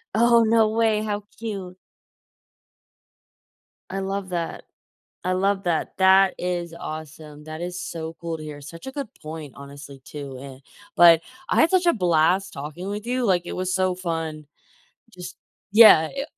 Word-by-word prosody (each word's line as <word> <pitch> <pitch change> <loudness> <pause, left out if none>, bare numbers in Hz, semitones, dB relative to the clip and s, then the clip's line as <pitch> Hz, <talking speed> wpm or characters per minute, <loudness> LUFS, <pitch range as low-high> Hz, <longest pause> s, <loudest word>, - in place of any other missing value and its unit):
Oh, 235 0 +5
no 220 -1 +3
way, 220 -1 +1
how 205 -1 -3 0.2
cute. 195 -5 -6 2.1
I 195 +1 -4
love 195 0 -4
that. 170 -2 -4 0.6
I 185 - +1
love 195 +1 0
that, 170 -3 -1
that 190 0 +5
is 175 -2 -3
awesome, 155 -1 -9
that 155 +1 -7
is 180 +1 -5
so 160 -1 -6
cool 170 -1 -4
to 155 - -9
hear 150 -1 -8
such 165 - -11
a - - -5
good 275 -3 -5
point, 155 -2 -8
honestly, 140 -1 -11
too, 140 -3 -8
eh, 135 -1 -10 0.4
but 170 -1 +8 0.3
I - - +3
had 320 - +4
such 370 -1 +2
a 340 - +4
blast 180 0 +2
talking 150 +7 -7
with 210 +3 -5
you, 250 0 -1
like, 180 -4 +2
it - - -5
was 185 0 -2
so 185 -1 +1
fun. 165 -4 -4 0.6
Just 180 -2 -10 0.3
Yeah, 205 -7 +8
i 275 - -2
180 Hz, 160 wpm, -23 LUFS, 155-200 Hz, 2.1 s, but